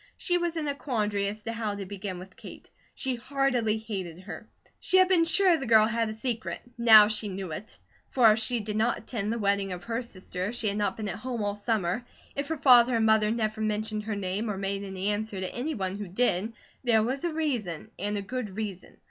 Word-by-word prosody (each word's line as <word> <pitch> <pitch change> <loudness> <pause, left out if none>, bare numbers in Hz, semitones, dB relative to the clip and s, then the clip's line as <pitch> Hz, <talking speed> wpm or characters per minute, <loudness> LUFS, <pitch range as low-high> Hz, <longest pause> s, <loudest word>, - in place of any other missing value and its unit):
She 355 -1 0
was 345 -1 -2
in 305 -2 -2
a 285 - 0
quandary 210 -8 -1
as 210 +1 -5
to 230 - -3
how 220 -3 -2
to 200 -1 -5
begin 195 -1 -5
with 180 0 -11
Kate. - - -12 0.2
She 260 -2 -2
heartily 250 -4 0
hated 190 -6 -6
her. 190 - -9 0.3
She 375 - +2
had 370 0 +6
been 355 -3 +4
sure 360 +2 +4
the 270 - -5
girl 220 -1 +6
had 230 0 0
a - - -4
secret, 230 0 -3 0.2
now 220 -3 +8
she 215 0 0
knew 190 -2 -5
it; 205 +8 -7 0.3
for 235 -4 +6
if 215 - +2
she 225 +1 0
did 210 0 -4
not 225 +2 +2
attend 215 -3 -3
the 230 - -1
wedding 200 -2 0
of 180 -1 -8
her 230 +3 -2
sister, 185 -5 -6
if 215 +5 -3
she 220 -3 0
had 200 - -3
not 205 -2 0
been 215 -2 -4
at 195 - -4
home 245 -2 -3
all 205 0 -1
summer, 205 -1 -1 0.3
if 280 0 -2
her 320 +1 -2
father 250 -3 +6
and 225 -1 +2
mother 220 -1 +4
never 220 -1 -1
mentioned 215 0 -1
her 215 -1 -2
name 200 +3 -2
or 200 - -2
made 195 +1 -2
any 190 0 -3
answer 210 -1 -2
to 185 - -4
any 295 +6 -3
one 190 0 -3
who 205 - -5
did, 200 +1 +1 0.3
there 225 -3 +4
was 260 +4 -2
a 345 - +1
reason, 245 - -2
and 205 +2 -2
a 200 - -3
good 250 +1 -4
reason. 195 -2 -6
215 Hz, 235 wpm, -28 LUFS, 200-240 Hz, 0.3 s, now